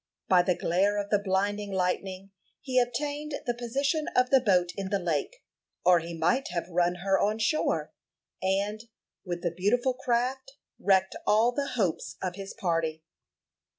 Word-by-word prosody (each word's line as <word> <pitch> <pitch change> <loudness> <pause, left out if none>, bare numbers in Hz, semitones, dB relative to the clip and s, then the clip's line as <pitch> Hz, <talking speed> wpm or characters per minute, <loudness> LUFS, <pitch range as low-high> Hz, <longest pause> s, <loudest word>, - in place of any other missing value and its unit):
By 180 -1 +6
the 180 0 +1
glare 195 +5 +1
of 205 0 -3
the 205 - +4
blinding 205 +1 -1
lightning 190 +1 -2 0.3
he 255 -2 +1
obtained 290 +5 -2
the 240 - 0
position 275 +6 -1
of 250 0 +3
the 270 - +7
boat 180 -6 +3
in 195 -1 -4
the 200 - +1
lake, 165 -6 -2 0.4
or 180 -1 +6
he 165 0 -7
might 175 +12 +1
have 170 -1 -3
run 175 0 +1
her 195 -1 +3
on 210 +2 +1
shore, 225 +8 0 0.5
and, 200 +3 0 0.4
with 175 -2 -5
the 175 - 0
beautiful 240 +8 +1
craft, 255 +1 -1 0.3
wrecked 190 -1 +2
all 220 +3 +4
the 280 +2 -3
hopes 190 -7 -1
of 185 -1 -3
his 195 +1 -8
party. 165 -6 -1
200 Hz, 160 wpm, -28 LUFS, 180-245 Hz, 0.5 s, the